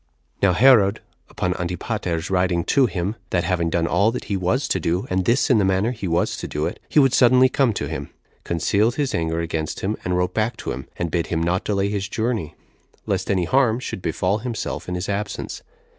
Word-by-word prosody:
1. 100 Hz, -, +4 dB
Now -, -, +3 dB
Herod, 110 Hz, -2 st, +5 dB, 0.3 s
upon 90 Hz, 0 st, -1 dB
Antipater's 90 Hz, 0 st, -3 dB
writing 90 Hz, -2 st, +1 dB
to 135 Hz, -, +3 dB
him, 95 Hz, +3 st, -3 dB
that 90 Hz, -2 st, +1 dB
having 85 Hz, -1 st, 0 dB
done 80 Hz, 0 st, 0 dB
all 100 Hz, +5 st, +3 dB
that 120 Hz, -, -4 dB
he 100 Hz, -, -3 dB
was 95 Hz, +9 st, 0 dB
to 95 Hz, -, +1 dB
do, 85 Hz, +3 st, -1 dB
and 95 Hz, 0 st, +1 dB
this 120 Hz, +2 st, +2 dB
in 120 Hz, -, +5 dB
the -, -, +3 dB
manner 95 Hz, +4 st, +1 dB
he 110 Hz, -6 st, -5 dB
was 85 Hz, +1 st, 0 dB
to -, -, -5 dB
do 75 Hz, +1 st, -2 dB
it, -, -, -4 dB
he -, -, -2 dB
would 135 Hz, -3 st, +5 dB
suddenly 130 Hz, 0 st, +5 dB
come 130 Hz, -2 st, +2 dB
to -, -, -3 dB
him, -, -, -5 dB, 0.3 s
concealed 100 Hz, +7 st, +1 dB
his 145 Hz, -3 st, -1 dB
anger 80 Hz, 0 st, -1 dB
against 80 Hz, -2 st, -3 dB
him, 105 Hz, +3 st, -1 dB
and 90 Hz, 0 st, 0 dB
wrote 90 Hz, 0 st, 0 dB
back 110 Hz, +2 st, -1 dB
to -, -, -4 dB
him, 65 Hz, +3 st, -6 dB
and 85 Hz, -2 st, -2 dB
bid 85 Hz, 0 st, 0 dB
him 80 Hz, -1 st, -1 dB
not 90 Hz, +2 st, 0 dB
delay 100 Hz, -1 st, 0 dB
his 100 Hz, -1 st, -3 dB
journey, 110 Hz, -9 st, -2 dB, 0.5 s
lest -, -, -2 dB
any 95 Hz, -3 st, +1 dB
harm 125 Hz, +1 st, +2 dB
should 110 Hz, -, -5 dB
befall 95 Hz, +4 st, 0 dB
himself 115 Hz, -5 st, -4 dB
in 90 Hz, -, -2 dB
his 90 Hz, +2 st, -3 dB
absence. 100 Hz, +1 st, -4 dB
95 Hz, 220 wpm, -22 LUFS, 85-115 Hz, 0.5 s, Herod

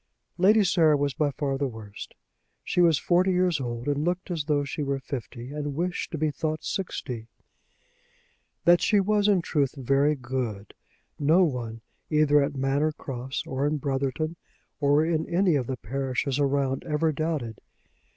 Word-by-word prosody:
Lady 210 Hz, +4 st, +5 dB
Sarah 165 Hz, -5 st, +4 dB
was 140 Hz, -1 st, 0 dB
by 150 Hz, 0 st, +1 dB
far 135 Hz, 0 st, -2 dB
the 140 Hz, -, +1 dB
worst. 110 Hz, -4 st, -9 dB, 0.5 s
She 180 Hz, -, +1 dB
was 165 Hz, -4 st, +5 dB
forty 180 Hz, +2 st, +2 dB
years 180 Hz, -5 st, +2 dB
old, 120 Hz, 0 st, -4 dB
and 145 Hz, 0 st, 0 dB
looked 180 Hz, +2 st, -2 dB
as 160 Hz, -4 st, -2 dB
though 145 Hz, -2 st, +1 dB
she 145 Hz, +2 st, -4 dB
were 140 Hz, -1 st, -1 dB
fifty 130 Hz, -2 st, -7 dB
and 145 Hz, -1 st, -4 dB
wished 175 Hz, +3 st, -2 dB
to 160 Hz, -, -4 dB
be 155 Hz, 0 st, 0 dB
thought 155 Hz, +3 st, -3 dB
sixty. 125 Hz, -, -4 dB, 1.4 s
That 175 Hz, 0 st, +6 dB
she 210 Hz, -1 st, +3 dB
was, 205 Hz, +1 st, +2 dB
in 195 Hz, -4 st, +3 dB
truth, 140 Hz, -5 st, 0 dB
very 140 Hz, +3 st, +2 dB
good, 120 Hz, -6 st, -4 dB, 0.5 s
no 160 Hz, +6 st, +4 dB
one 120 Hz, -7 st, -2 dB, 0.3 s
either 150 Hz, -1 st, +4 dB
at 140 Hz, +1 st, -1 dB
Manor 140 Hz, +3 st, +1 dB
Cross 130 Hz, -2 st, -5 dB
or 135 Hz, +2 st, -1 dB
in 150 Hz, +1 st, 0 dB
Brotherton 140 Hz, +4 st, -2 dB, 0.4 s
or 145 Hz, +1 st, +3 dB
any 170 Hz, +3 st, +1 dB
of 130 Hz, -5 st, 0 dB
the 130 Hz, -, -3 dB
parishes 135 Hz, +3 st, -2 dB
around 140 Hz, -1 st, +1 dB
ever 160 Hz, 0 st, +1 dB
doubted. 145 Hz, -7 st, -3 dB
145 Hz, 160 wpm, -26 LUFS, 135-165 Hz, 1.4 s, That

